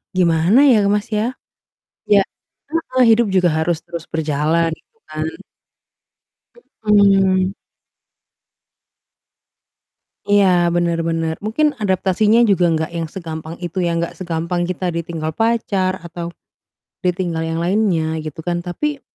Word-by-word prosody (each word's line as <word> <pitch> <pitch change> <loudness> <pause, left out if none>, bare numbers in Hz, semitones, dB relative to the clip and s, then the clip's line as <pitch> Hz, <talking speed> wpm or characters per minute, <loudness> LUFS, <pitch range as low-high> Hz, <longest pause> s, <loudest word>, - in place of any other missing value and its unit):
gimana 175 - +4
ya, 210 -3 +4
Mas, 205 +1 0
ya. 220 +4 -1 0.8
Ya 205 - +7 0.5
heeh, 260 -6 +1
hidup 235 -1 +1
juga 185 -2 +3
harus 160 +1 0
terus 170 -2 -6
berjalan 160 +1 +1
gitu 225 - -33
kan? 155 0 -4 1.6
Mhm. 195 -2 +4 2.8
Iya, 185 -4 +4
benar 170 -1 +1
benar, 165 -1 -1
mungkin 290 +9 +1
adaptasinya 205 +4 +3
juga 180 -3 +3
enggak 160 0 -1
yang 165 -1 -3
segampang 160 -2 -7
itu 175 0 -7
ya, 170 0 0
enggak 170 0 -2
segampang 170 0 -3
kita 185 0 -3
ditinggal 165 -2 -4
pacar, 200 -3 0
atau 170 0 -6 0.7
ditinggal 180 -2 -1
yang 165 - -2
lainnya 170 -5 +1
gitu 155 0 -7
kan, 175 -1 -1
tapi 275 +12 -3
175 Hz, 115 wpm, -19 LUFS, 165-205 Hz, 2.8 s, Ya